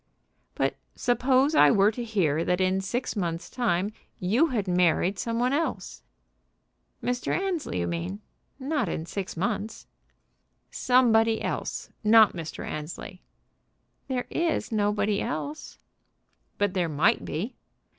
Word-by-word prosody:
"But - - 0 0.2
suppose 255 +4 +2
I 150 - +7
were 200 +6 +4
to 240 +2 -5
hear 170 -9 +1
that 180 +1 0
in 185 +1 +2
six 240 +7 -3
months' 170 -3 -3
time 205 -5 0 0.3
you 225 - +3
had 225 -9 -2
married 180 +2 +2
some 230 -1 -2
one 250 +2 +2
else?" 320 +3 -2 1.0
"Mr. 245 0 -1
Annesley, 360 - -2
you - - 0
mean. 85 +3 -3 0.4
Not 270 - -1
in 160 - -3
six 190 0 -5
months." 200 +4 -3 0.9
"Somebody 230 -3 +3
else. - - -3
Not 220 0 +6
Mr. 165 -3 -6
Annesley." 160 +4 -7 0.9
"There 255 -2 -2
is 335 -6 -1
nobody 205 -1 +1
else." 290 +5 -5 0.8
"But 205 -2 +1
there 180 -3 0
might 155 +5 +2
be." 205 +11 -4
210 Hz, 125 wpm, -27 LUFS, 180-245 Hz, 1.0 s, I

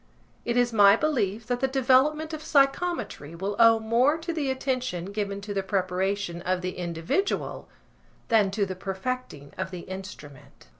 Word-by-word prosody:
It 235 +1 0
is 245 -1 +2
my 200 -2 +7
belief 230 -8 -1
that 245 +1 -1
the 265 - +1
development 270 +4 +2
of 310 - -5
psychometry 275 - 0
will 195 +4 -3
owe 230 -1 +7
more 240 +7 +2
to 335 +1 -4
the 295 -4 -1
attention 255 -8 -2
given 200 -1 -3
to 205 0 -5
the 195 - 0
preparation 190 -1 -1
of 185 +1 -1
the 185 0 -4
individual 170 - -2 0.6
than 215 -4 +3
to 200 +1 0
the 190 -1 -5
perfecting 190 - -5
of - - -2
the 180 -2 -7
instrument. 170 - -10
210 Hz, 160 wpm, -26 LUFS, 190-260 Hz, 0.6 s, my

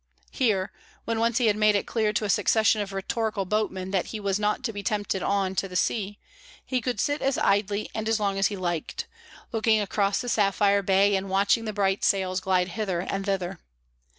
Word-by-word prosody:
Here, 210 -8 0 0.3
when 230 -1 -1
once 230 0 +1
he 245 - +2
had 210 -2 +3
made 215 0 +3
it 200 - 0
clear 220 -2 0
to 215 0 -1
a - - -3
succession 220 +1 +3
of 200 -1 -5
rhetorical 200 +1 -2
boatmen 190 -2 -2
that 190 -3 0
he 220 - -5
was 200 -1 -1
not 210 +4 0
to 230 -3 -2
be 205 - -5
tempted 205 -2 -1
on 195 -1 0
to 195 - 0
the 180 - -10
sea, 205 +2 -1 0.5
he 255 -2 -1
could 245 -3 -2
sit 290 +5 0
as 270 0 +1
idly 205 +1 +1
and 220 0 -3
as 225 -1 +2
long 200 -2 0
as 195 - +4
he 205 - -5
liked, 175 -3 -3 0.5
looking 225 -2 +2
across 200 -1 0
the 245 - -5
sapphire 200 -2 +2
bay 195 +1 +3
and 190 0 -2
watching 200 +4 +2
the 215 - -2
bright 195 -1 0
sails 185 -1 +1
glide 185 -1 +1
hither 190 -3 -2
and 195 +2 -4
thither. 190 -2 -2
205 Hz, 210 wpm, -26 LUFS, 195-220 Hz, 0.5 s, as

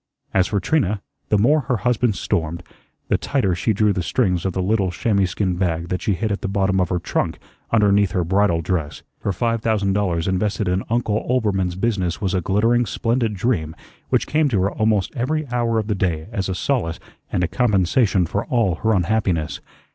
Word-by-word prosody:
As 95 -1 +3
for 100 - 0
Trina, 105 - +1 0.3
the 105 - +3
more 140 +10 +4
her 125 -3 -1
husband 120 0 +1
stormed, 85 -4 -2 0.5
the - - +2
tighter 125 -10 0
she 85 +6 0
drew 105 0 +2
the 90 - -1
strings 90 -2 0
of 95 - -3
the 95 - -1
little 100 -1 +1
chamois 100 +2 +1
skin 90 0 -1
bag 85 -2 -1
that 90 - -2
she 100 - 0
hid 110 +2 -2
at 100 - -2
the - - -2
bottom 95 -1 +1
of 90 - 0
her 90 - 0
trunk 85 - -2 0.3
underneath 100 -3 +3
her 90 - +1
bridal 95 -1 +2
dress. 80 -3 -3 0.2
Her 100 - -1
five 115 +3 -1
thousand 105 -4 +1
dollars 90 -5 0
invested 100 +2 0
in 90 +1 +1
Uncle 115 -2 0
Oelbermann's 100 -8 +1
business 95 -4 -1
was 95 -2 -1
a 95 - +1
glittering, 115 +6 +2
splendid 115 +1 0
dream 90 -7 -1 0.3
which - - +2
came 150 -1 +2
to 100 -7 +1
her 100 - +1
almost 110 -3 0
every 145 +5 -1
hour 120 -2 +1
of 110 - 0
the 105 - -1
day 85 -5 -1
as 95 -3 -2
a 95 - -1
solace 90 -5 -1 0.3
and 90 - 0
a - - +2
compensation 95 -1 +2
for 100 +5 -2
all 115 -7 +1
her 110 +2 +1
unhappiness. 90 -4 0
100 Hz, 200 wpm, -21 LUFS, 90-115 Hz, 0.5 s, more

